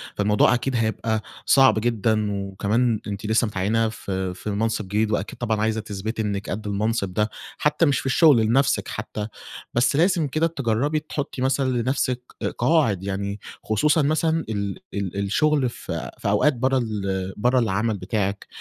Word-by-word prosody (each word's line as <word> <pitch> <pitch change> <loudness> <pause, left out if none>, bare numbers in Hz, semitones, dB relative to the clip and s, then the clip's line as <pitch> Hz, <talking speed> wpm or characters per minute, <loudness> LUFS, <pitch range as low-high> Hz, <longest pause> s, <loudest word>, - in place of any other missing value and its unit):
فالموضوع 105 +2 +3
أكيد 125 +2 -1
هيبقى 110 -1 0 0.2
صعب 135 -5 +5
جدًا 110 -2 +1
وكمان 100 +4 0
أنتِ 100 +1 -5
لسّه 110 +2 +2
متعيِّنة 105 +3 0
في 95 -4 -4
في 95 - -10
المنصِب 105 +1 -1
جديد، 105 +2 0
وأكيد 105 -1 -2
طبعًا 110 -3 0
عايزة 110 0 0
تثبتي 110 +2 -4
إنِّك 100 -2 -3
قد 105 +2 -4
المنصِب 105 -1 -1
ده، 105 +3 +1 0.3
حتّى 150 +3 +2
مش 145 -3 +2
في - - -8
الشغل 145 0 +5
لنفسِك 135 +5 +2
حتّى، 105 -1 -5 0.5
بس 120 +4 +2
لازم 170 0 +3
كده 155 +4 +1
تجرّبي 140 0 0
تحطّي 145 -3 -5
مثلًا 130 0 +1
لنفْسِك 130 0 0 0.4
قواعد 125 - +2
يعني، 100 +1 -3 0.2
خصوصًا 150 +9 +2
مثلًا 160 +2 +1
ال 100 -2 -3
ال 100 -2 -3
الشغل 130 +7 +2
في - - -6
في - - -2
أوقات 150 - +3
برّه 130 +2 +1
ال 95 -5 -2
برّه 125 +4 +3
العمل 110 -1 0
بتاعِك، 100 +1 -2
110 Hz, 160 wpm, -23 LUFS, 100-130 Hz, 0.5 s, صعب